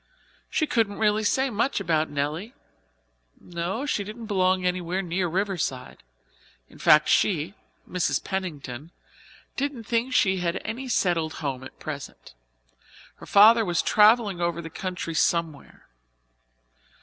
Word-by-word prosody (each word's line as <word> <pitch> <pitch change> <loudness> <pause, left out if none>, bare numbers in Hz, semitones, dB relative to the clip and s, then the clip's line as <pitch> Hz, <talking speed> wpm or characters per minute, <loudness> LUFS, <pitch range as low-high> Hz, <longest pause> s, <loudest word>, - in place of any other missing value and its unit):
She 310 - +1
couldn't 225 -8 0
really 215 0 +2
say 260 +5 +2
very 270 - 0
much 240 +5 +1
about 160 -1 0
Nelly. 150 - -3 0.8
No, 180 +9 -4
she 215 -8 -1
didn't 215 +3 -8
belong 185 -3 +1
anywhere 180 +1 -1
near 180 +1 -1
Riverside. 175 - -3 0.7
In - - -17
fact, 150 0 +5
she 175 -2 +2 0.3
Mrs. 180 -2 -1
Pennington 155 -7 -5 0.7
didn't 275 -4 -3
think 235 +4 -1
she 190 -6 +3
had 175 0 -1
any 240 +5 -5
settled 170 -8 +1
home 135 -4 -4
at 130 - -12
present. 140 - -8 0.8
Her - - -13
father 225 +3 +7
was 175 -4 0
travelling 210 -3 +4
over 170 -1 -1
the 165 -1 -7
country 180 -1 -5
somewhere. 165 -3 -1
185 Hz, 130 wpm, -25 LUFS, 165-215 Hz, 0.8 s, father